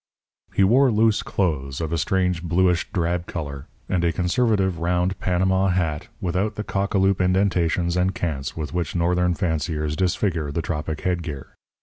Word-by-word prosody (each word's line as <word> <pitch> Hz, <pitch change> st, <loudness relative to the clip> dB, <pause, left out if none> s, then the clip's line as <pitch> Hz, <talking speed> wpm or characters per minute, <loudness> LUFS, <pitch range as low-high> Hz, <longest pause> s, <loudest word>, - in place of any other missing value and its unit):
He 100 Hz, -, +2 dB
wore 130 Hz, +7 st, +5 dB
loose 110 Hz, -1 st, +3 dB
clothes 70 Hz, -8 st, -1 dB
of 80 Hz, -1 st, -3 dB
a -, -, +1 dB
strange 90 Hz, +2 st, +1 dB
bluish 90 Hz, +1 st, +1 dB
drab 85 Hz, 0 st, -1 dB
colour, 70 Hz, -5 st, -6 dB, 0.2 s
and 90 Hz, -2 st, 0 dB
a 85 Hz, -, +3 dB
conservative, 95 Hz, 0 st, +1 dB
round 90 Hz, +2 st, 0 dB
Panama 95 Hz, +1 st, +2 dB
hat 85 Hz, -5 st, -1 dB
without 95 Hz, +4 st, -1 dB
the 105 Hz, -, -3 dB
cock 100 Hz, 0 st, -2 dB
a -, -, +5 dB
loop 95 Hz, 0 st, +3 dB
indentations 90 Hz, -2 st, +1 dB
and 90 Hz, +1 st, +1 dB
cants 75 Hz, -5 st, -3 dB
with 75 Hz, -1 st, -4 dB
which 90 Hz, 0 st, -2 dB
Northern 90 Hz, +1 st, +2 dB
fanciers 80 Hz, -4 st, -1 dB
disfigure 90 Hz, -4 st, 0 dB
the 80 Hz, +3 st, -2 dB
tropic 75 Hz, -1 st, -3 dB
head 90 Hz, -2 st, 0 dB
gear. 70 Hz, -5 st, -7 dB
90 Hz, 165 wpm, -23 LUFS, 80-95 Hz, 0.2 s, wore